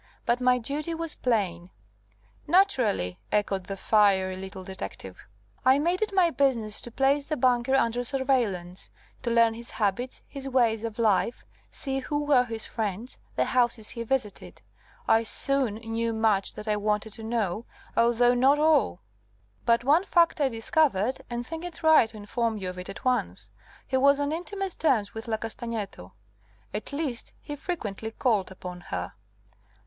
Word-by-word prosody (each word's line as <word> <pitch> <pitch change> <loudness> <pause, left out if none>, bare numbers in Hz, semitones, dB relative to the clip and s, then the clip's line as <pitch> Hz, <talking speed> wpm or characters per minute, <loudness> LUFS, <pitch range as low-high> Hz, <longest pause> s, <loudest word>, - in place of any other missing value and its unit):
But 240 +2 +1
my 250 0 +4
duty 290 +7 -3
was 330 -1 -1
plain 185 -8 -1 0.4
" 105 0 -36 0.3
"Naturally," 250 - +2
echoed 200 -3 0
the 195 +1 -5
fiery 195 -3 +3
little 190 0 -8
detective. 190 +1 -8 0.4
"I 260 +1 +5
made 345 +6 0
it 435 - 0
my 370 -4 +3
business 235 -8 +1
to 240 - -5
place 275 +3 +2
the 305 0 -2
banker 250 +1 +2
under 245 -2 +1
surveillance, 235 -9 -1 0.3
to 245 - -2
learn 230 -1 +4
his 235 +1 -9
habits, 230 +4 -2
his 275 -1 -6
ways 230 -4 +2
of 225 -2 -4
life, 230 +1 +1 0.2
see 270 -1 -3
who 290 +2 -2
were 275 -4 +4
his 225 -2 -5
friends, 220 +1 -4 0.2
the 130 - +2
houses 240 - +1
he 235 - -5
visited. 230 -3 -3 0.4
I 225 - +5
soon 255 0 +1
knew 225 +1 -2
much 220 -3 +1
that 210 - -7
I 210 -1 +1
wanted 210 0 -1
to 225 - -10
know, 220 -2 -1 0.3
although 240 +1 +4
not 265 +4 +4
all. 300 - +3 0.7
But 235 0 +4
one 300 +7 +4
fact 340 -3 +3
I 275 - +3
discovered, 235 -1 +1
and 240 0 -4
think 325 +4 -6
it 340 -1 -7
right 315 -8 +6
to 220 - -12
inform 220 +2 -2
you 190 -3 -4
of 180 0 -7
it 180 - -7
at - - -9
once. 95 - -1 0.3
He 260 - 0
was 280 +2 +4
on 285 0 0
intimate 380 +3 -4
terms 220 -10 +2
with 225 +1 -7
La 220 -1 0
Castagneto 220 - -6 0.6
at 210 - -4
least, 280 -5 -3
he 295 - -7
frequently 220 - -4
called 220 -4 0
upon 180 -1 -8
her." 90 0 -4
235 Hz, 165 wpm, -27 LUFS, 210-270 Hz, 0.7 s, right